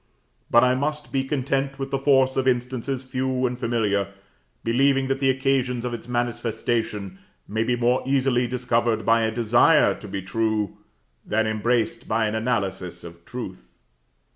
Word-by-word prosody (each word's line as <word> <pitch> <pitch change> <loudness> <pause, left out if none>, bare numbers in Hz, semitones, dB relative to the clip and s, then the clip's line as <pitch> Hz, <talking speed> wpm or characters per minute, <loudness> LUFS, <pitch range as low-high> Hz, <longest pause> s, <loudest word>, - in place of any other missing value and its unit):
But 120 +1 +6
I 125 0 +4
must 150 +3 -2
be 135 -1 +1
content 135 0 -1
with 135 0 -5
the 135 - 0
force 135 -1 +3
of 130 0 0
instances 130 +1 -1
few 130 0 -1
and 125 0 -2
familiar, 105 -5 0 0.5
believing 135 +3 +2
that 135 0 0
the 135 -1 +2
occasions 130 -2 0
of 125 - -3
its 120 0 -7
manifestation 115 -4 -2 0.3
may 110 +2 0
be 125 +1 +1
more 120 +1 +2
easily 130 -2 +1
discovered 120 -2 0
by 115 0 +4
a 110 - +1
desire 120 +7 +4
to 105 - -10
be 95 -1 -5
true, 110 0 -1 0.5
than 110 +1 0
embraced 115 +2 0
by 110 +1 +1
an 105 - -1
analysis 105 -6 -2
of 85 0 -11
truth. 105 -7 -8
120 Hz, 160 wpm, -24 LUFS, 110-130 Hz, 0.5 s, But